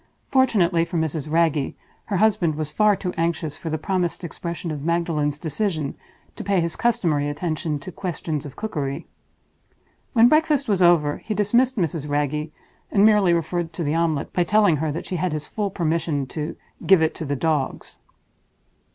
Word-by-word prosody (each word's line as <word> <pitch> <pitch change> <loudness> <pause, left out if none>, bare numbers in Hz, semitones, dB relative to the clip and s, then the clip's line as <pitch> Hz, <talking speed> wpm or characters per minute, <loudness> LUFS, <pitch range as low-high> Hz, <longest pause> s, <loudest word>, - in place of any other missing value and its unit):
Fortunately 195 -11 +3
for 170 +1 -3
Mrs. 155 -2 -2
Wragge, 160 -4 +1 0.3
her 200 - -1
husband 185 -6 +2
was 155 -1 -3
far 210 +2 +4
too 180 -2 -4
anxious 165 -3 -1
for 165 - -5
the 155 - -1
promised 180 0 -2
expression 170 0 -5
of 150 -2 -4
Magdalen's 160 -2 0
decision 160 -2 -2 0.4
to - - -6
pay 195 -1 +2
his 170 -1 -1
customary 170 -12 +1
attention 155 0 -2
to 145 +6 -9
questions 160 -4 -4
of 140 -2 -9
cookery. 145 -11 -3 1.1
When 235 -2 +7
breakfast 300 -1 +3
was 195 -3 +1
over, 165 -4 +4
he 215 - -4
dismissed 240 +5 +2
Mrs. 165 -5 -1
Wragge, 150 +1 -1 0.4
and 200 0 +5
merely 210 -4 +5
referred 170 0 -1
to 170 - -3
the 150 0 0
omelette 165 -3 0
by 180 - +2
telling 200 -3 +3
her 155 +1 -1
that 160 - -5
she 185 - -3
had 175 0 -1
his 150 -1 -4
full 210 -2 -2
permission 165 -5 -1
to 155 -1 -4 0.3
"give 190 -4 +5
it 160 - +1
to - - -6
the 145 0 -1
dogs." 150 -1 -2
170 Hz, 175 wpm, -23 LUFS, 150-190 Hz, 1.1 s, When